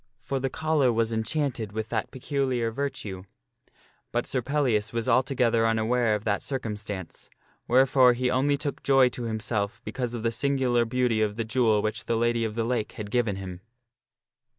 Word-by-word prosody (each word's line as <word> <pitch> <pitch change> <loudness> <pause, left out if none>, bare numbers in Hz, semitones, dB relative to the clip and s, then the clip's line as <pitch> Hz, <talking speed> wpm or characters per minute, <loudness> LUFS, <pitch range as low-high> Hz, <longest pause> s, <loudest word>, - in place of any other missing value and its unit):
For 135 - -2
the 135 +1 -1
collar 155 -3 +1
was 115 0 0
enchanted 115 -2 -2
with 110 0 -3
that 110 -2 -2
peculiar 130 -3 -1
virtue; 110 -8 -4 0.9
but 120 0 0
Sir 130 - -1
Pellias 125 -5 0
was 115 0 -2
altogether 120 -2 +3
unaware 115 0 +2
of 105 - -4
that 100 -2 0
circumstance, 105 - -5 0.4
wherefore 130 0 +5
he 125 +1 0
only 140 +3 +2
took 145 0 -4
joy 135 -2 +5
to 120 -1 -6
himself 110 0 -2
because 120 -1 -3
of 115 - -5
the 115 - +2
singu 130 +1 0
lar 120 -1 +4
beauty 120 -2 +1
of 105 -1 0
the 115 0 -2
jewel 110 -3 +2
which 110 - -2
the 115 - 0
Lady 120 0 +1
of 110 -1 -3
the 115 - 0
Lake 115 -2 -1
had 105 -2 -7
given 115 -5 +1
him. 95 -2 -7
120 Hz, 175 wpm, -26 LUFS, 110-130 Hz, 0.9 s, wherefore